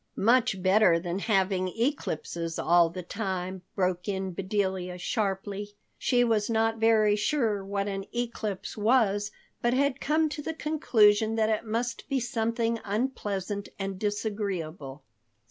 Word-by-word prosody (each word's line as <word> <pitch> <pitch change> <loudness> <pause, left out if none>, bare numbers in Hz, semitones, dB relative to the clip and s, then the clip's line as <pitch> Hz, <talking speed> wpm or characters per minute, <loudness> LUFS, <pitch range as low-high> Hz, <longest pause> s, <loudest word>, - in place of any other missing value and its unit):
"Much 230 -3 +2
better 190 -2 +5
than 175 +2 -3
having 190 -3 +1
eclipses 175 - -2
all 170 0 +4
the 180 +2 -7
time," 190 -1 -4
broke 180 -1 0
in 190 -2 -2
Bedelia 190 -1 -2
sharply. 205 +1 -3 0.2
She 245 -2 +3
was 220 -3 +1
not 225 0 +1
very 220 -2 +4
sure 215 -3 0
what 200 +1 -2
an 195 -1 -3
eclipse 230 -5 -3
was, 210 -2 +2 0.3
but 240 +1 +2
had 275 0 +1
come 310 +2 +2
to 295 - -5
the 320 +2 -4
conclusion 225 -9 +3
that 220 -1 +2
it 220 +1 0
must 235 +4 -3
be 275 -2 +1
something 230 -1 -1
unpleasant 205 -3 -2
and 195 -1 -4
disagreeable. 195 -9 -3
205 Hz, 135 wpm, -28 LUFS, 190-230 Hz, 0.3 s, better